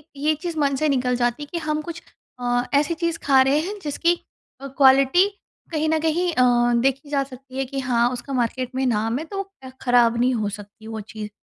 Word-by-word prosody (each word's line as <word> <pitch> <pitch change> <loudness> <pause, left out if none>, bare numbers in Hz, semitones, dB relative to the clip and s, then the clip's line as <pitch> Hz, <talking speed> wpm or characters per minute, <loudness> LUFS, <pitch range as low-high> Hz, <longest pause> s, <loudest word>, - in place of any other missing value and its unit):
ये 300 +3 +1
चीज़ 335 +1 -5
मन 280 -1 +2
से 305 +3 +1
निकल 250 -2 +1
जाती 240 +3 0
हैं 290 - -10
कि 345 - -3
हम 305 0 0
कुछ 335 +1 -7 0.4
अ, 245 0 0
ऐसी 290 +4 +3
चीज़ 335 0 -2
खा 270 -2 +5
रहे 270 +3 +3
हैं 400 +6 -4
जिसकी 335 +4 +1 0.5
अ, 275 - -6
क़्वालिटी 275 +6 +5 0.4
कहीं 310 0 0
न 320 0 +2
कहीं 335 +3 +1
अ, 240 -2 +3
देखी 270 +2 0
जा 280 -2 +1
सकती 265 0 -12
है 270 - 0
कि 270 +2 -5
हाँ, 245 -2 +2
उसका 250 +3 -6
मार्केट 255 +1 -2
में 265 0 0
नाम 225 0 0
है 315 - -5
तो 390 +3 -4 0.2
अ, 260 - -8
ख़राब 240 -2 +4
नहीं 250 +1 +3
हो 215 -3 -1
सकती 205 +1 -10
वो 220 -1 -5
चीज़। 210 0 -8
270 Hz, 220 wpm, -23 LUFS, 245-305 Hz, 0.5 s, खा